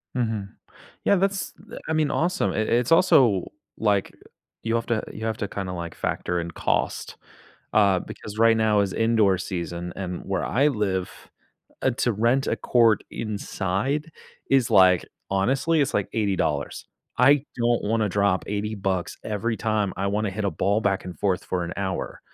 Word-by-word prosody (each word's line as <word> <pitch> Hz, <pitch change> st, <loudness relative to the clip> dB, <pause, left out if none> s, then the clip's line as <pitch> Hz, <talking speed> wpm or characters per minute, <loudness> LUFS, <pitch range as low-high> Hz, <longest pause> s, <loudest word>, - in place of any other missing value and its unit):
Mhm, 110 Hz, -5 st, -1 dB, 0.6 s
yeah, -, -, +5 dB
that's 195 Hz, -1 st, -1 dB
th 225 Hz, +4 st, -12 dB
I 160 Hz, -, 0 dB
mean, 155 Hz, -2 st, +1 dB
awesome, 180 Hz, +4 st, 0 dB
I -, -, -4 dB
it's 115 Hz, +4 st, +1 dB
also 140 Hz, -, +4 dB, 0.3 s
like, 100 Hz, -3 st, +1 dB, 0.5 s
you 115 Hz, 0 st, 0 dB
have 115 Hz, -, -1 dB
to 115 Hz, -2 st, 0 dB
you 110 Hz, -, -6 dB
have 110 Hz, -1 st, -1 dB
to 100 Hz, -, -3 dB
kinda, 95 Hz, -2 st, -5 dB
like, 85 Hz, -2 st, -6 dB
factor 90 Hz, 0 st, -2 dB
in 85 Hz, 0 st, -6 dB
cost, -, -, -1 dB, 0.6 s
uh, 100 Hz, -4 st, +4 dB
because 105 Hz, 0 st, -9 dB
right 115 Hz, 0 st, +5 dB
now 110 Hz, -1 st, +3 dB
is 100 Hz, -2 st, 0 dB
indoor 110 Hz, -4 st, +3 dB
season 85 Hz, -1 st, -4 dB
and 90 Hz, -2 st, -4 dB
where -, -, -2 dB
I 135 Hz, +5 st, +2 dB
live, 100 Hz, -7 st, -1 dB, 0.7 s
uh, 130 Hz, -, +3 dB
to 120 Hz, -, +2 dB
rent 120 Hz, +6 st, +2 dB
a -, -, +1 dB
court 115 Hz, -3 st, +3 dB
inside 110 Hz, -, -2 dB, 0.4 s
is, 135 Hz, -4 st, +3 dB
like 95 Hz, -4 st, +6 dB, 0.3 s
honestly, 135 Hz, +11 st, +2 dB
it's, 140 Hz, -, 0 dB
like, 100 Hz, -, 0 dB
$80 105 Hz, -3 st, +1 dB
dollars, 70 Hz, -4 st, -2 dB, 0.3 s
I 145 Hz, 0 st, +5 dB
don't 120 Hz, -1 st, +1 dB
wanna 110 Hz, 0 st, +1 dB
drop 100 Hz, -1 st, +1 dB
$80 105 Hz, +2 st, -2 dB
bucks 95 Hz, -3 st, -2 dB
every 110 Hz, +2 st, -2 dB
time 105 Hz, -3 st, 0 dB
I 100 Hz, +2 st, -1 dB
wanna 105 Hz, +1 st, 0 dB
hit 105 Hz, +2 st, -4 dB
a 100 Hz, -, +1 dB
ball 100 Hz, +4 st, +1 dB
back 95 Hz, -3 st, 0 dB
and 90 Hz, -1 st, -7 dB
forth 95 Hz, -3 st, 0 dB
for 90 Hz, -1 st, -2 dB
an 85 Hz, -, -5 dB
hour, 95 Hz, -2 st, -3 dB
105 Hz, 175 wpm, -24 LUFS, 95-120 Hz, 0.7 s, like